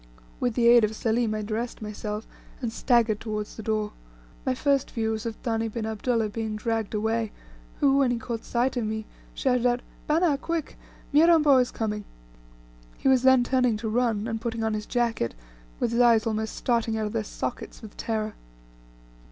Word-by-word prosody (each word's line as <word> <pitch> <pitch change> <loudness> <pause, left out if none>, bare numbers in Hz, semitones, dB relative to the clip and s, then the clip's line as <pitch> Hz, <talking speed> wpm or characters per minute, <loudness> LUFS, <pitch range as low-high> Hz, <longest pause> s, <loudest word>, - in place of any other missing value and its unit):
With 245 -3 0
the 235 -1 +3
aid 235 -1 +7
of 215 +1 +1
Selim 225 0 0
I 215 - -3
dressed 225 +3 -3
myself, 210 0 -5 0.3
and 235 -3 -3
staggered 230 -5 +2
towards 215 -2 -4
the - - -7
door. 215 -1 -1 0.6
My 255 - +2
first 280 0 +1
view 220 -1 -1
was 220 +1 -3
of 225 - -4
Thani 225 -1 0
bin 225 0 -4
Abdullah 220 0 0
being 220 0 -3
dragged 225 -1 -2
away, 220 +1 0 0.5
who, 275 -1 +4
when 270 -2 +4
he 245 - 0
caught 230 0 -5
sight 250 +2 0
of 240 - 0
me, 220 0 -3 0.3
shouted 250 -2 +1
out 245 0 +1 0.3
"Bana 310 -2 +3
quick 330 0 -3 0.4
Mirambo 305 -2 +6
is 250 -1 +3
coming." 210 -2 -3 0.9
He - - +1
was 260 -2 +5
then 260 -1 +6
turning 250 -3 +2
to 220 0 -3
run, 225 -2 +1
and 225 -1 -3
putting 230 -1 -2
on 220 -1 0
his 210 0 -3
jacket, 235 - 0 0.4
with 230 - 0
his 235 +1 +3
eyes 230 -2 +5
almost 220 -1 -2
starting 230 -2 0
out 215 - -1
of 210 - -4
their 225 -2 0
sockets 230 +2 -5
with 215 - -10
terror. 215 -1 -2
230 Hz, 185 wpm, -26 LUFS, 220-245 Hz, 0.9 s, aid